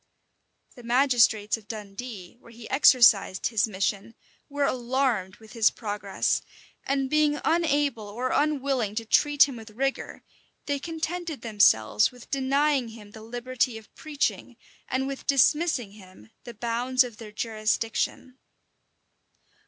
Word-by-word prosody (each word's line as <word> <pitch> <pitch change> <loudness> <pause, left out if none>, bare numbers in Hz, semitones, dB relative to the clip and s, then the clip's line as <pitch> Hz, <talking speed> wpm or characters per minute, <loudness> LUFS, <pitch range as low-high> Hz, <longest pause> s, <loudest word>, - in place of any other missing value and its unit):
The 245 - -12
magistrates 235 -4 +2
of 215 -2 -18
Dundee, 210 -2 -8
where 235 - -17
he 230 -1 -11
exercised 240 -8 +5
his 225 -2 +1
mission, 200 +2 -3 0.3
were 285 0 -2
alarmed 245 -7 -1
with 220 -1 -16
his 225 -2 +4
progress; 205 -3 -2 0.4
and 275 0 -1
being 300 +1 +2
unable 290 -9 +1
or 245 +5 -3
unwilling 275 -7 0
to 225 0 -3
treat 290 +5 +4
him 265 -4 -7
with 220 -1 -11
rigor, 270 +5 -3 0.4
they 285 -1 -2
contented 325 0 -5
themselves 110 - +3
with 245 -1 -16
denying 275 0 +1
him 220 -2 -12
the 220 - -12
liberty 245 +1 -2
of 220 -2 -15
preaching, 300 -2 -3 0.3
and 260 +1 -1
with 275 0 -6
dismissing 280 - +2
him 190 +1 -16
the 240 - -9
bounds 240 +3 +1
of 240 -4 -9
their 220 -2 -10
jurisdiction. 225 +3 -2
240 Hz, 130 wpm, -26 LUFS, 215-275 Hz, 0.4 s, exercised